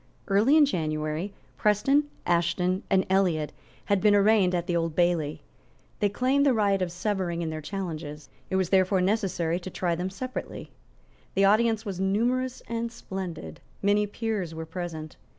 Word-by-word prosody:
Early 215 +10 +4
in 305 - +7
January, 155 - -2 0.3
Preston, 270 +8 +3 0.2
Ashton 175 +2 +1
and 190 -1 +3
Elliot 180 -6 +1 0.3
had 200 -2 +1
been 210 -1 +5
arraigned 200 -3 +4
at 175 -1 -1
the 175 -1 -1
Old 165 -2 -1
Bailey. 170 -4 +1 0.6
They 205 - +2
claimed 260 +7 +2
the 275 -4 +4
right 200 -3 +2
of 180 -2 -1
severing 175 -2 -2
in 160 - -3
their 155 0 -5
challenges. 155 -4 -5 0.2
It - - -1
was 190 -2 +1
therefore 190 0 +3
necessary 180 -4 0
to 185 - -7
try 175 -1 -1
them 180 +3 -2
separately. 255 +7 -6 0.6
The 195 +1 +4
audience 220 +2 +3
was 195 -3 -4
numerous 240 +7 0
and 230 0 -3
splendid. 180 - -6 0.2
Many 205 +1 +3
peers 205 -6 -3
were 160 0 -5
present. 160 -2 -6
190 Hz, 160 wpm, -27 LUFS, 170-210 Hz, 0.6 s, in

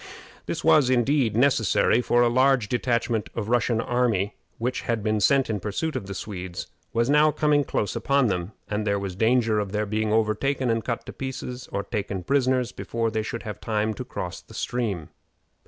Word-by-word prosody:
This - - -3
was, 145 -5 +5
indeed, 125 -2 +2
necessary, 120 -3 +3
for 120 0 +3
a - - +4
large 130 -1 +3
detachment 120 -1 0
of 110 - -2
the 110 - -5
Russian 120 -1 +2
army 115 -5 +1 0.2
which 125 +2 -2
had 115 -3 -2
been 110 0 +1
sent 135 +6 +3
in 110 -2 -2
pursuit 110 - -3
of 95 - -4
the 100 - -6
Swedes 90 -3 -6 0.3
was 115 +1 +1
now 150 +2 +5
coming 150 -1 +2
close 105 -6 -2
upon 140 -1 +2
them, 90 -3 -1 0.2
and 105 0 -2
there 100 0 +2
was 100 -2 -4
danger 110 0 +2
of 100 -1 -3
their 105 0 0
being 110 +1 -1
overtaken 115 +4 +1
and 115 -1 0
cut 120 -2 -3
to - - -8
pieces 130 -1 -6
or 100 - -2
taken 100 -2 -3
prisoners 130 +1 +1
before 115 -1 -2
they 110 0 0
should 115 +2 -5
have 105 -3 -7
time 110 0 0
to - - -6
cross - - -6
the - - -15
stream. 105 -10 -2
115 Hz, 195 wpm, -25 LUFS, 105-125 Hz, 0.3 s, was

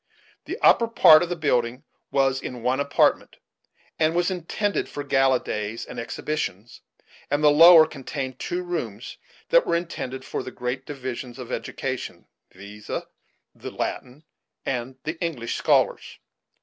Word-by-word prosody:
The 370 +5 -5
upper 230 - +5
part 160 -8 +7
of 175 - -2
the 175 - -2
building 125 -4 0 0.3
was 135 -1 +1
in 125 -2 -7
one 125 +2 +1
apartment, 140 0 +1 0.6
and 160 +1 +2
was 175 +2 +1
intended 190 +3 -2
for 145 - -6
gala 135 -2 +3
days 105 +1 -4
and - - -8
exhibitions; 120 -3 -5 0.5
and 145 +1 0
the 150 - +7
lower 165 +1 +9
contained 135 -2 -6
two 180 +1 -3
rooms 125 - -5 0.3
that - - +4
were - - +2
intended 130 -6 -4
for - - -4
the - - -7
great 125 +1 -5
divisions 130 -3 -6
of 125 -3 -8
education, - - -5 0.3
viz., 100 +2 -12
the - - -9
Latin 130 +5 -5 0.4
and 125 0 -3
the 155 +2 -5
English 130 -9 -3
scholars. - - +1
135 Hz, 145 wpm, -24 LUFS, 125-165 Hz, 0.6 s, lower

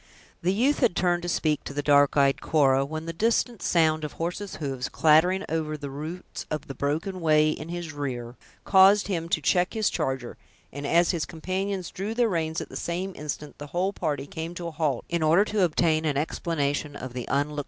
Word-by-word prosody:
The 180 - +2
youth 255 +9 +2
had 240 - +2
turned 175 -1 +1
to 175 - -4
speak 155 -3 0
to 140 - -7
the 145 - -1
dark 145 0 +4
eyed 140 -1 +3
Cora, 135 -4 +3
when 155 +3 -5
the 165 - -4
distant 230 +4 0
sound 160 -2 +2
of 150 - -4
horses 180 +4 -4
hoofs, 135 -4 -3
clattering 170 +5 +4
over 155 -1 -2
the 140 -2 -6
roots 155 +6 -6
of 155 -1 -3
the 135 - -7
broken 160 +7 -2
way 155 -1 +4
in 155 +1 -6
his 170 -2 -5
rear, 125 -4 -4 0.3
caused 195 +1 +6
him 170 -3 -2
to 160 - +2
check 180 +4 +1
his 220 -2 +1
charger; 135 -6 -3 0.4
and, 140 +1 -5
as 170 +2 +4
his 165 -5 -2
companions 185 +2 -3
drew 205 +4 -4
their 240 -1 +3
reins 160 -3 -1
at - - -7
the - - -10
same 185 +3 -3
instant, 150 0 -6
the 145 - -7
whole 185 +6 -1
party 145 -7 -2
came 160 +4 -6
to 175 - -6
a 170 - -4
halt, 150 -5 -1
in 170 -1 -1
order 165 +6 +4
to 215 -1 -1
obtain 160 -1 +2
an 150 -3 0
explanation 145 -1 -1
of 130 -1 -7
the 125 -1 -4
unlooked - - -12
for 140 - +3
interruption. 150 0 -6
160 Hz, 215 wpm, -26 LUFS, 145-180 Hz, 0.4 s, caused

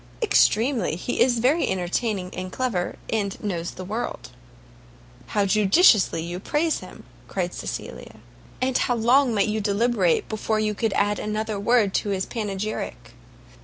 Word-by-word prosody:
"Extremely; 250 - +2
he 210 +8 -3
is 245 -1 +4
very 265 +9 +2
entertaining 185 +1 -2
and 185 0 -5
clever, 220 -8 -2 0.2
and 200 -3 -1
knows 175 -5 -2
the 185 - -8
world." 200 - -5 1.0
"How 205 -1 +1
judiciously 200 - +4
do - - -6
you 175 +1 -5
praise 305 - 0
him!" - - -12 0.2
cried - - -3
Cecilia; - - -7 0.4
"and 255 0 0
how 245 - +2
long 245 +3 +4
might 205 -3 +2
you 215 0 -1
deliberate 200 -3 +1
before 215 0 -1
you 215 -1 0
could 220 0 -1
add 205 +1 +1
another 215 0 -3
word 210 -2 +2
to 205 - 0
his 190 -1 -1
panegyric!" 205 - -4
215 Hz, 150 wpm, -24 LUFS, 190-240 Hz, 1.0 s, is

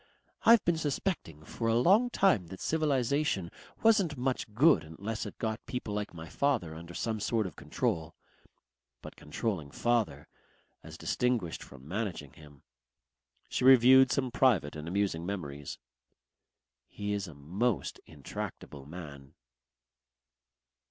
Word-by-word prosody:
I've 230 -2 +7
been 165 -2 +2
suspecting 140 - -3
for 115 - -3
a 115 - +3
long 200 - +5
time 185 - +3
that 95 +2 -9
Civilization 140 - 0 0.3
wasn't 200 -10 +4
much 125 -3 -2
good 145 +9 +5
unless 100 +8 -5
it - - -10
got 110 -1 -3
people 125 -4 -4
like 105 0 -3
my 80 -1 -9
father 100 - 0
under 85 +2 -10
some 110 -2 -2
sort 110 +1 0
of 90 - -6
control. 80 - -2 0.9
But - - -9
controlling 80 0 -3
father 105 -10 0 0.5
as - - -11
distinguished 120 -9 -1
from 70 0 -13
managing 90 -7 -4
him!" 75 -3 -16 0.8
She - - -2
reviewed 130 0 +7
some 130 -3 0
private 120 - +2
and 75 +1 -7
amusing 95 -2 0
memories. 75 -7 -5 1.1
"He 105 0 -4
is 100 -2 -2
a 80 - -11
most 90 - -1
intractable 70 -1 -7
man." 75 -5 -10
105 Hz, 130 wpm, -30 LUFS, 80-130 Hz, 1.1 s, I've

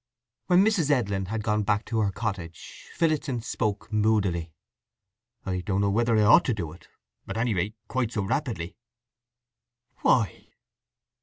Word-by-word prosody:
When 185 +2 +5
Mrs. 195 -9 +2
Edlin 100 -9 +1
had 110 +1 -3
gone 105 0 +1
back 105 +1 0
to 115 - -1
her 105 -2 +1
cottage 95 -7 -6
Phillotson 155 -6 0
spoke 110 -1 -3
moodily. 100 -6 +1 0.9
"I 90 -1 -2
don't 95 +1 -1
know 100 0 +2
whether 115 +2 +2
I 105 - +4
ought 110 +11 +6
to 125 - +1
do 85 -7 -4
it—at 85 +5 -12
any 115 0 +1
rate 100 +4 -2
quite 125 -4 -1
so 105 -3 -1
rapidly." 105 - -2 1.2
"Why?" 110 -8 +1
105 Hz, 145 wpm, -26 LUFS, 95-120 Hz, 1.2 s, ought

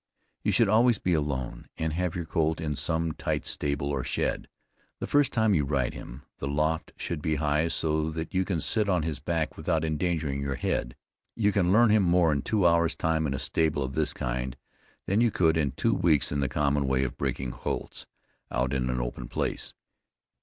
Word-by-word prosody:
You - - +1
should 115 -3 +4
always 115 +3 +4
be 90 - 0
alone, 70 -5 -2
and 80 -1 -1
have 90 0 -1
your 85 -2 -3
colt 80 0 0
in 75 -3 -2
some 80 +2 0
tight - - -2
stable 70 -1 -1
or 70 -3 -1
shed, - - -1 0.5
the - - -3
first 145 -2 +3
time 110 -3 +2
you 75 -6 +3
ride 70 -3 0
him; 65 +4 -9 0.2
the 70 - -3
loft 75 +3 0
should 85 -3 -4
be 80 0 0
high 75 +2 +1
so 80 -1 0
that 80 +1 -5
you 95 0 +2
can 90 -3 -1
sit 105 +3 +1
on 90 -4 +2
his 75 -3 -2
back 80 +2 -2
without 80 0 0
endangering 80 -3 -1
your 70 -1 -2
head. - - -2 0.4
You 105 -2 +2
can 95 -3 +2
learn 115 +2 +5
him 110 -1 +5
more 85 -2 +4
in 70 -2 0
two 100 +4 +1
hours 85 -1 +3
time 80 -1 0
in 70 - -1
a - - -2
stable 75 0 0
of 65 0 -4
this 75 -1 +2
kind, 65 0 -3 0.5
than 100 +4 +2
you 120 - +4
could 80 -6 +2
in 70 -5 0
two 115 +10 +1
weeks 80 -7 +2
in 70 - -1
the 70 -3 0
common 70 0 +1
way 65 0 +2
of 65 - -3
breaking 65 -2 -2
colts, - - -5 0.4
out 65 +2 -1
in 65 -2 0
an 60 0 -1
open - - -4
place. - - -3
80 Hz, 210 wpm, -28 LUFS, 70-85 Hz, 0.5 s, learn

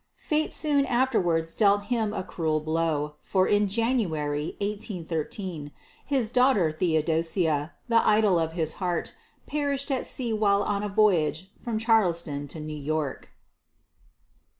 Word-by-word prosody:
Fate 310 0 -1
soon 285 -3 +2
afterwards 180 -11 +1
dealt 205 -1 +3
him 220 -1 -1
a 190 - -3
cruel 160 -4 -1
blow, 155 -1 -1
for 185 -1 +1
in 205 0 +3
January, 175 - -1
1813, 180 -5 -4 0.3
his 260 -6 0
daughter, 250 -10 +3
Theodosia, 160 -1 0
the 230 -1 +4
idol 210 -4 +4
of 160 0 -1
his 160 -2 -1
heart, 175 -2 -1 0.3
perished 285 -1 -2
at 260 - -1
sea 240 -3 -2
while 205 -2 +2
on 200 -1 -1
a 210 - -3
voyage 190 -4 +2
from 230 -2 -3
Charleston 170 -10 +1
to 155 - -7
New 155 0 -6
York. 150 -1 -3
190 Hz, 130 wpm, -26 LUFS, 160-220 Hz, 0.3 s, the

